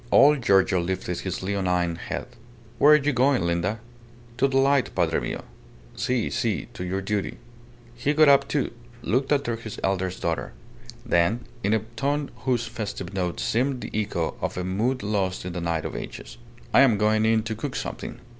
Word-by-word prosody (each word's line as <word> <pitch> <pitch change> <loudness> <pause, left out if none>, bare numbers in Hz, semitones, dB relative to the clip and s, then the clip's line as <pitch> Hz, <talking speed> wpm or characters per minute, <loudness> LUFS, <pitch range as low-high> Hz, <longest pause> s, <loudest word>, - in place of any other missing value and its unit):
Old 145 0 +6
Giorgio 95 -4 +4
lifted 90 0 -3
his 95 -1 -4
leonine 90 -3 0
head. - - -5 0.5
"Where 150 +3 +8
are - - +9
you 150 -1 +2
going, 130 -4 +3
Linda?" 85 +6 0 0.6
"To 135 - +4
the 135 0 0
light, 135 0 +3
padre 85 -3 +2
mio." - - -4 0.5
"Si, 125 -3 0
si 110 -4 -1
to 120 - -6
your 95 +2 -2
duty." 100 0 -2 0.6
He 140 +5 -1
got 155 0 +6
up, 140 -1 +6
too, 145 - -1 0.3
looked 130 +4 0
after 140 -5 +1
his 115 -2 -8
eldest 95 -1 -1
daughter; 85 -1 -2 0.5
then, 85 +8 +2 0.2
in 100 - +2
a 110 -1 -2
tone 140 +4 -1 0.2
whose 120 -3 +2
festive 105 -5 -5
note 90 -3 -2
seemed 130 +2 0
the - - -6
echo 105 -6 -1
of - - -2
a 90 - -1
mood 110 +8 -1
lost 95 -3 -1
in 90 - -4
the 90 - -4
night 85 -2 -1
of - - -4
ages - - -8 0.3
"I - - +7
am 130 -6 +6
going 110 +1 +2
in 110 0 +3
to 115 0 -3
cook 110 - -5
something. - - -5
110 Hz, 185 wpm, -25 LUFS, 95-130 Hz, 0.6 s, are